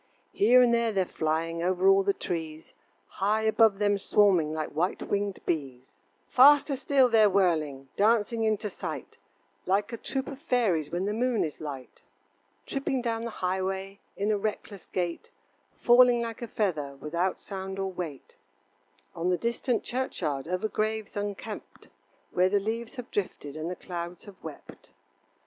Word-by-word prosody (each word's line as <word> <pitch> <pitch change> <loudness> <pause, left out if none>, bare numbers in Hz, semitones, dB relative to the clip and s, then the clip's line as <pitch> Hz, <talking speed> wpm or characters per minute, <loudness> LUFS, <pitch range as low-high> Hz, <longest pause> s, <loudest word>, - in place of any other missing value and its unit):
Here 250 +4 +6
and 240 -1 +3
there 235 -1 +2
they're 190 -3 +1
flying 165 +1 -2
Over 185 +2 +1
all 195 0 +6
the 200 +1 +2
trees, 160 -4 -5 0.3
High 210 +3 0
above 220 -2 +4
them 205 -1 +2
swarming 190 -7 +3
Like 155 -1 -3
white 170 +5 -1
winged 200 -1 -2
bees. 135 -6 -4 0.3
Faster 280 +2 +6
still 270 -1 +3
they're 220 -3 +5
whirling, 155 -8 +1
Dancing 225 +2 +2
into 215 -1 0
sight, - - -7 0.5
Like 205 +4 +1
a - - -3
troop 265 +3 -3
of 275 -2 -7
fairies 215 - +1
When 175 +4 -2
the 205 - -1
moon 240 0 +1
is 155 -1 -5
light. 140 -4 -8 0.6
Tripping 270 -2 -2
down 230 -1 -2
the - - -3
highway 190 0 -3 0.2
In 205 +2 0
a 210 - +1
reckless 205 -2 -5
gait, 175 -2 -3 0.5
Falling 245 0 +6
like 230 0 -6
a 235 - -4
feather 155 -11 -2
Without 170 +5 -1
sound 190 -1 -6
or 195 0 -2
weight. 165 -7 -7 0.8
On 170 +2 -1
the 180 - +2
distant 235 +2 -1
churchyard 155 - -3
Over 185 +4 -1
graves 215 0 -2
unkept, 205 +1 -6 0.4
Where 180 +1 +3
the 205 +1 +2
leaves 225 +4 -4
have 250 -1 -8
drifted 150 -7 -3
And 155 +2 -4
the 180 - -4
clouds 175 -1 -7
have 200 -2 -14
wept. - - -11
200 Hz, 160 wpm, -28 LUFS, 175-225 Hz, 0.8 s, Here